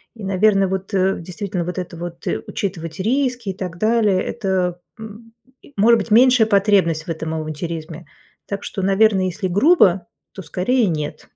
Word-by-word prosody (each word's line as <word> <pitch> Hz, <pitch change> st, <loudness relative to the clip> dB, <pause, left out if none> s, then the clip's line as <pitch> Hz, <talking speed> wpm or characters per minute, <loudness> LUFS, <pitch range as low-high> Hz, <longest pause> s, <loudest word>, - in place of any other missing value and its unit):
И, 220 Hz, -, -11 dB
наверное, 195 Hz, 0 st, +2 dB
вот, 190 Hz, +2 st, -4 dB
э, 190 Hz, 0 st, +1 dB
действительно, 180 Hz, +1 st, -5 dB
вот 180 Hz, +2 st, -5 dB
это 175 Hz, -2 st, -5 dB
вот, 170 Hz, 0 st, -8 dB
э, -, -, -1 dB
учитывать 175 Hz, -3 st, -5 dB
риски 245 Hz, -1 st, -1 dB
и -, -, -2 dB
так 180 Hz, -3 st, -6 dB
далее- 215 Hz, -3 st, +2 dB
это, 185 Hz, -5 st, -2 dB, 0.2 s
м 220 Hz, +1 st, -11 dB, 0.3 s
и, 285 Hz, -, -19 dB
может 225 Hz, +3 st, +4 dB
быть, 210 Hz, -, -6 dB
меньшая 245 Hz, -1 st, +5 dB
потребность 195 Hz, -6 st, +2 dB
в 170 Hz, -, -13 dB
этом 160 Hz, 0 st, -4 dB
авантюризме. 160 Hz, +1 st, -6 dB, 0.4 s
Так 200 Hz, 0 st, -5 dB
что, 195 Hz, -, -5 dB
наверно, 195 Hz, 0 st, +3 dB
если 185 Hz, +2 st, -3 dB
грубо, 195 Hz, -, +4 dB, 0.3 s
то 195 Hz, -, -8 dB
скорее 215 Hz, +6 st, 0 dB
нет. 155 Hz, -3 st, -4 dB
195 Hz, 170 wpm, -20 LUFS, 175-215 Hz, 0.4 s, меньшая